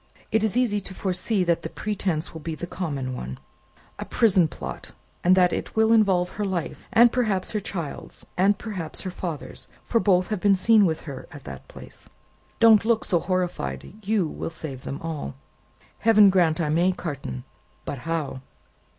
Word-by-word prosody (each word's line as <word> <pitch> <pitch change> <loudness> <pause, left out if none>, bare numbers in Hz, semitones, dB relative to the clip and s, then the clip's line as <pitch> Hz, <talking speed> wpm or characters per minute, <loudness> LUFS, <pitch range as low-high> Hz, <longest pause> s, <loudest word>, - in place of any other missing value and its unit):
It 220 -1 +2
is 220 +1 +1
easy 230 -5 +2
to 190 -1 -7
foresee 190 +2 0
that 170 -1 +1
the 160 - -5
pretence 185 -6 -2
will 160 - -8
be 160 +1 -4
the 175 - -5
common 140 -8 -4
one, 65 - -6 0.6
a - - -4
prison 195 -8 +3
plot, - - -7 0.3
and 180 +1 +6
that 180 -1 +4
it - - -4
will 220 +1 +4
involve 190 -5 +3
her 210 - -4
life 185 -5 -3
and 235 +1 +6
perhaps 215 -7 0
her 215 - -1
child's 170 -7 -6
and 195 +2 +3
perhaps 190 -9 -5
her 185 - -4
father's 170 -4 -6 0.2
for 230 - +2
both 185 -4 +3
have 215 -3 -1
been 200 +1 +4
seen 210 +1 +5
with 160 -1 -2
her 140 -4 -8
at 145 -4 -11
that 65 0 -9
place. - - -12 0.5
Don't 225 -3 +7
look 225 0 +1
so 175 -4 +2
horrified. 175 - -2
You 200 -4 +1
will - - -5
save 150 -5 -7
them 140 - -4
all." 155 - -4 0.6
"Heaven 210 -3 +6
grant 175 -4 +3
I 160 -3 0
may, 175 +4 +3
Carton! 140 - -5 0.4
But 140 - -4
how?" 145 -2 -3
180 Hz, 180 wpm, -25 LUFS, 160-205 Hz, 0.6 s, Don't